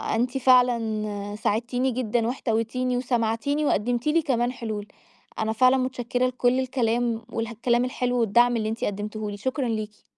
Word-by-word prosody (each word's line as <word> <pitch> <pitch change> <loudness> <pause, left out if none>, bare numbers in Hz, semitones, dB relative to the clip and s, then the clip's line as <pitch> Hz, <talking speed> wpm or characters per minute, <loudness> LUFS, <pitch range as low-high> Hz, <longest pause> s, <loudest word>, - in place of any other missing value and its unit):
أنتِ 245 +3 0
فعلًا 220 -5 +2
ساعدتيني 240 +4 0
جدًا، 235 -1 0
واحتويتيني، 245 +1 -1
وسمعتيني، 245 +4 0
وقدمتِ 240 +2 0
لي 325 +2 +3
كمان 245 -4 0
حلول. 220 -4 -5 0.5
أنا 220 0 0
فعلًا 255 +3 +4
مُتشكرة 255 -1 -1
لكل 255 0 +1
الكلام، 240 -2 0
والكلام 235 +2 0
الحلو، 250 -1 -1
والدعم 235 +2 +4
اللي 215 -1 -1
أنتِ 225 - -4
قدمتيه 210 +1 -3
لي. 205 - -6
شكرًا 260 +3 -2
ليكِ. 215 -2 -4
240 Hz, 140 wpm, -25 LUFS, 220-255 Hz, 0.5 s, فعلًا